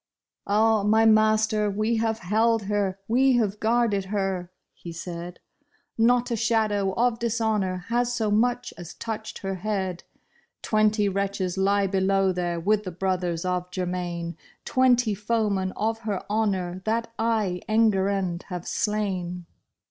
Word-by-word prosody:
" - - -66
Ah, 215 +1 +3
my 220 +2 +3
master, 215 -1 +3
we 215 +3 0
have 225 0 0
held 220 +3 +1
her, 200 -1 -1
we 260 +3 +4
have 210 -4 +1
guarded 220 -3 +1
her," 190 -3 -2 0.2
he 170 - -9
said; 170 +1 -7 0.3
" - - -42 0.2
Not 240 +2 +3
a - - +1
shadow 215 -3 +1
of 235 +1 +1
dishonor 215 -6 -1
has 240 +1 +1
so 225 -3 -1
much 245 +3 +1
as 175 -1 -9
touched 220 -1 -5
her 195 0 -2
head. 190 -2 -3 0.6
Twenty 215 -1 +2
wretches 195 -2 -1
lie 200 +1 +2
below 195 0 +2
there 175 -1 -2
with 210 +4 +1
the 185 - -4
brothers 180 -1 -2
of 180 0 -1
Germain, 175 -2 -3 0.3
Twenty 245 -4 +3
foemen 205 -2 0
of 225 +1 -1
her 210 -4 -4
honor 190 -4 -1
that 230 +1 -1
I, 215 -6 0
Enguerrand, 195 -5 +1
have 180 -2 -6
slain. 185 -5 -2
205 Hz, 140 wpm, -25 LUFS, 185-225 Hz, 0.6 s, we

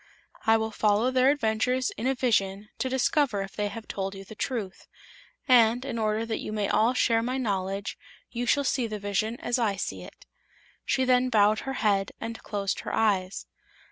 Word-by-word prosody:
I 225 0 +6
will 220 0 -2
follow 215 +3 +2
their 260 +1 +4
adventures 255 -1 +1
in 230 - -4
a 265 - +1
vision, 210 -5 0
to 260 - -1
discover 260 -4 +1
if 195 - -10
they 210 -1 -1
have 220 +2 -8
told 195 0 -4
you 195 0 -9
the 205 - -10
truth. 215 -4 -4 0.6
And, 245 0 +5
in 235 -4 -3
order 215 +1 0
that 225 -1 -3
you - - -5
may 210 -2 -1
all 230 +4 +2
share 230 -2 +3
my 250 +3 -2
knowledge, 195 -4 -2 0.3
you 245 0 -3
shall 285 +4 +3
see 255 -3 0
the 215 -1 -4
vision 210 +3 -2
as 245 +1 0
I 215 -4 +1
see 195 - -4
it." - - -13 0.6
She 260 - +2
then 255 0 +3
bowed 215 -2 +4
her 270 - -4
head 195 -2 +2
and 225 0 -6
closed 200 -2 -2
her - - -5
eyes. 195 -4 0
220 Hz, 195 wpm, -27 LUFS, 205-250 Hz, 0.6 s, I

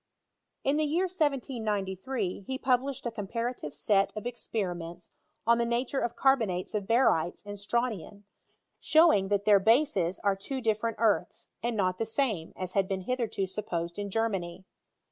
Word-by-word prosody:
In 280 +2 +2
the 310 - +2
year 325 +5 +1
1793 245 - -1
he 265 - -2
published 265 +1 0
a 235 - -1
comparative 230 - -4
set 195 +6 +2
of 215 - -5
experiments 180 -8 -4 0.3
on 235 +1 +4
the - - +3
nature 245 +3 0
of 240 0 -2
carbonates 225 -10 +1
of 205 -2 -2
barytea 225 -8 +2
and 205 0 -6
strontian; 205 -2 -2 0.6
showing 310 - +5
that 205 0 0
their 205 -2 +6
bases 210 - +3
are 200 -1 +3
twe 260 +8 -4
different 225 0 0
earths, 220 -2 +1
and 235 -1 -1
not 185 -2 0
the 225 - -1
same, 220 - -1
as 185 -1 -4
had 195 -1 +2
been 190 -1 -2
hitherto 230 -2 -1
supposed 175 -3 -4
in 205 0 -3
Germany. 190 -4 -2
215 Hz, 155 wpm, -29 LUFS, 190-245 Hz, 0.6 s, their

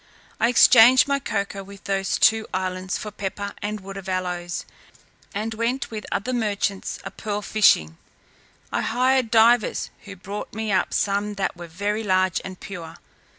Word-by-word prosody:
I 230 - +3
exchanged 245 +2 +7
my 280 0 +1
cocoa 200 -5 -4
in 200 - -10
those 195 -1 -1
two 220 +1 +4
islands 185 0 -2
for 210 - -6
pepper 200 0 -5
and 210 0 -3
wood 195 +1 -8
of 195 -1 -7
aloes, 180 -1 -3 0.7
and 215 +2 -3
went 235 +4 -2
with 215 -1 -6
other 250 +6 -1
merchants 205 -4 -1
a - - -6
pearl 210 -1 -4
fishing. 80 - +3 0.7
I - - 0
hired 255 0 +2
divers, 230 0 +3
who 200 -1 -9
brought 200 +3 -7
me 220 -1 -2
up 190 - +1
some 205 +1 0
that 195 -2 -2
were 175 0 -9
very 205 +6 -2
large 185 -3 +1
and 185 -1 -8
pure. 170 -4 -8
205 Hz, 160 wpm, -23 LUFS, 190-220 Hz, 0.7 s, exchanged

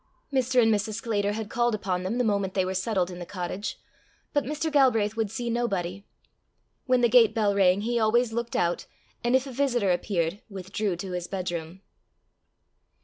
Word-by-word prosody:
Mr. 260 -1 +2
and 225 -2 +5
Mrs. 210 +1 -1
Sclater 210 -3 -1
had 220 0 -4
called 240 +1 +1
upon 185 -3 -2
them 190 +6 -2
the 250 - +2
moment 200 -4 0
they 190 -2 +2
were 185 - -2
settled 190 -1 0
in 175 - -8
the - - -5
cottage; 185 +2 -4 0.6
but 290 - +2
Mr. 305 +3 -2
Galbraith 225 -7 +3
would 225 -2 -1
see 240 +3 -4
nobody. 200 -6 -2 0.8
When 255 -1 +3
the 240 - +5
gate 225 -2 +5
bell 210 -3 +2
rang, 195 -1 +4
he 235 +2 0
always 225 +1 +2
looked 235 0 -3
out, 175 0 0 0.4
and 240 +2 +3
if 260 +1 +2
a 270 - -7
visitor 245 -7 +1
appeared, 175 0 -1
withdrew 195 0 -3
to 185 +2 -6
his 180 -1 -3
bedroom. 175 -2 -4
210 Hz, 185 wpm, -27 LUFS, 185-240 Hz, 0.8 s, and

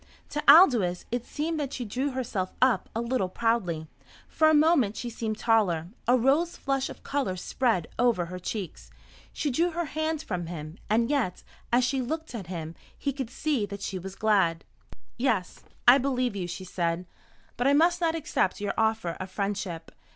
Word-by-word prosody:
To 295 - -3
Aldous 235 - +5
it 245 0 -2
seemed 315 +2 -2
that 280 -3 -3
she 245 - -4
drew 255 +7 -1
herself 230 -8 -3
up 255 -1 +3
a 230 - 0
little 235 -5 -1
proudly. 185 -7 0 0.4
For 315 -1 +3
a - - +4
moment 295 -9 +4
she 240 - -4
seemed 220 -1 -3
taller. 190 -9 +2 0.2
A 250 +1 +5
rose 285 +8 +2
flush 275 -1 -1
of - - -11
colour 275 -10 -1
spread 185 -1 0
over 235 -8 +3
her 180 +2 -7
cheeks. 190 -1 -6 0.4
She 295 - -2
drew 335 +8 +2
her 345 0 -2
hand 315 +1 -2
from 175 - -4
him. 160 +1 -7
And 230 +4 +2
yet, 240 -11 -1 0.3
as 245 +1 +4
she 260 +1 +1
looked 315 +5 -4
at 205 -7 -6
him, 165 -3 -5 0.2
he 280 - -2
could 265 -3 -4
see 260 -5 -1
that 200 -1 -7
she 190 - -3
was 190 +2 -8
glad. 195 -7 +2 0.6
"Yes, 225 -8 -1 0.2
I 250 +3 +9
believe 255 -4 0
you," 185 -3 -3
she 180 +2 -6
said. 175 -1 -2 0.5
"But 245 - 0
I 280 - +5
must 345 +4 +3
not 330 -1 +2
accept 305 - 0
your 205 -1 -2
offer 220 -4 +1
of 185 - -5
friendship. 195 -4 -3
230 Hz, 185 wpm, -27 LUFS, 185-275 Hz, 0.6 s, I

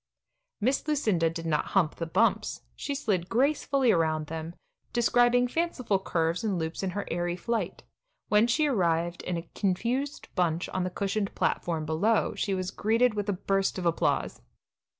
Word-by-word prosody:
Miss 260 +7 0
Lucinda 215 - +2
did 165 0 -6
not 155 -2 +1
"hump 165 -5 +2
the 165 - -3
bumps"; 195 +8 +1
she 285 - -3
slid 200 -11 -1
gracefully 275 0 +2
around 160 -3 +1
them, 160 +2 -6 0.4
describing 245 +1 +4
fanciful 255 - 0
curves 165 -1 -1
and 205 -4 0
loops 160 0 -3
in 195 - -1
her 205 - -2
airy 175 +1 -1
flight. 230 +6 -3 0.4
When 210 +2 +4
she 300 +6 +2
arrived 175 - +1
in 180 -1 -3
a 170 0 -7
confused 240 +9 -1
bunch 170 -2 0
on 185 - -1
the 180 - -1
cushioned 200 +2 -2
platform 165 -3 0
below, 200 +9 +1
she 195 -2 -1
was 185 0 -3
greeted 230 +4 +2
with 205 -1 -2
a - - +2
burst 195 +1 0
of 180 - -4
applause. 170 -1 0
195 Hz, 165 wpm, -28 LUFS, 170-235 Hz, 0.4 s, describing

